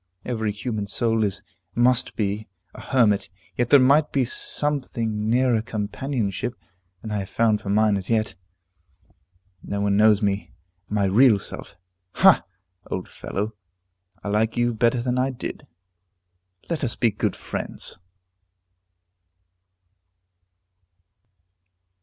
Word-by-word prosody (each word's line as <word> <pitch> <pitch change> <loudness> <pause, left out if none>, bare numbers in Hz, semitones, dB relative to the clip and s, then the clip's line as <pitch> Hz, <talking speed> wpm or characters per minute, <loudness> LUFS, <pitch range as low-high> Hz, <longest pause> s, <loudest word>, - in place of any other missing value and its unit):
Every 110 -3 -1
human 105 -1 -4
soul 115 +2 +1
is 100 -3 -1 0.3
must 120 +1 +2
be 105 0 -2 0.3
a - - -10
hermit, 105 -7 +2 0.3
yet 120 -1 0
there 145 - +8
might 145 +4 +4
be 135 -2 +2
something 115 -6 -1
nearer 120 -1 +3
companionship 115 +1 -3 0.5
than 110 - -6
I 105 - -1
have 95 -1 -5
found 110 0 +2
for 100 - -6
mine 105 0 +3
as 95 -1 -5
yet. 110 -2 +1 1.3
No 100 - -4
one 100 -1 +2
knows 105 0 +5
me. 100 0 -1 0.4
My 105 -1 +1
real 110 +3 +5
self 100 0 -8 0.4
Ha! - - +6 0.5
old 95 - -4
fellow, 105 +3 -4 0.7
I 105 - -3
like 110 +3 +1
you 120 0 +2
better 120 +2 +1
than 125 0 0
I 130 +1 +2
did; 130 - -7 1.0
let 165 -4 -2
us 120 - -1
be 115 -3 +2
good - - -1
friends. - - -5
110 Hz, 125 wpm, -24 LUFS, 105-125 Hz, 1.3 s, there